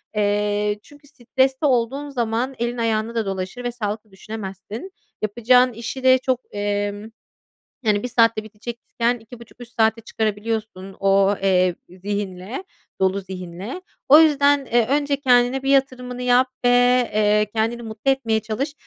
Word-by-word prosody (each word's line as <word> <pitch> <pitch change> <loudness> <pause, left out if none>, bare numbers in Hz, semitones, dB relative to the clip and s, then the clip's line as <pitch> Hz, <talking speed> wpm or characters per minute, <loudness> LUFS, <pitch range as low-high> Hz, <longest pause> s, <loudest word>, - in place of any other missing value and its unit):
Eee, 205 0 0
çünkü 290 0 -18
stresli 265 +1 0
olduğun 265 +3 0
zaman 245 0 -2
elin 240 +1 -2
ayağına 225 0 -1
da 225 -2 0
dolaşır 190 +5 -4
ve 245 - -2
sağlıklı 215 -2 -5
düşünemezsin. 210 - -8 0.3
Yapacağın 245 +4 +3
işi 230 +3 -6
de 260 0 +6
çok, 255 -1 -1
emm, 205 +1 -3 0.7
yani 210 -2 +1
1 - - -1
saatte 230 -2 +3
bitecekken 230 +2 -3
2-2,5-3 235 +1 -13
saatte 225 -1 +1
çıkarabiliyorsun 215 -3 -3
o, 195 0 +3
eee, 185 -2 +3
zihinle, 195 - -5 0.4
dolu 190 +1 +2
zihinle. 185 - -7 0.3
O 295 +3 +10
yüzden, 285 -3 +4
eee, 235 -2 +2
önce 285 +1 +1
kendine 250 -1 +3
bir 270 - -1
yatırımını 255 -2 0
yap 250 +1 +4 0.2
ve, - - +6 0.4
eee, 210 0 +3
kendini 230 +2 0
mutlu 220 +4 -1
etmeye 225 -5 0
çalış. 225 +7 -3
225 Hz, 135 wpm, -22 LUFS, 205-250 Hz, 0.7 s, O